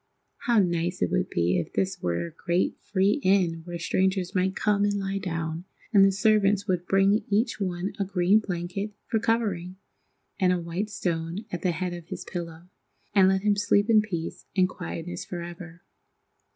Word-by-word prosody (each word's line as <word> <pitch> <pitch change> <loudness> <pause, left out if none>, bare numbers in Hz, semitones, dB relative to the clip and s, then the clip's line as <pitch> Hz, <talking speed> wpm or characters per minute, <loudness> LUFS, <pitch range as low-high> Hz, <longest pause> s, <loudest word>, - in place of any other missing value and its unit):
How 240 -1 +4
nice 175 -2 +1
it 90 - 0
would - - 0
be 85 +1 +1
if 85 - -5
this 190 -2 -1
were 85 - -1
a 170 - -8
great, 170 +3 0
free 200 +5 +1
inn 185 -5 +2
where 175 -1 -5
strangers 185 +2 0
might 190 0 +1
come 205 -1 +2
and 205 0 +1
lie 195 0 -2
down, 165 -2 -3 0.3
and 200 -2 +7
the 195 - +6
servants 205 -1 +3
would 180 -2 -1
bring 195 +2 +3
each 215 +2 +1
one 185 0 -2
a - - +2
green 190 +1 +3
blanket 195 +1 -4
for 225 - 0
covering, 200 -6 -1 0.6
and 185 -2 +4
a 180 - +2
white 175 +5 -3
stone 170 +1 -3
at 175 - -4
the 185 - +1
head 180 +1 -3
of 170 -2 -8
his - - -6
pillow, 170 -1 -6 0.5
and 195 -2 +6
let 190 0 +2
him 210 -1 +3
sleep 205 +2 +2
in 215 -1 +6
peace 175 -6 -5
and 185 -1 +5
quietness 175 -1 -6
forever. 175 -1 -8
185 Hz, 180 wpm, -26 LUFS, 170-200 Hz, 0.6 s, and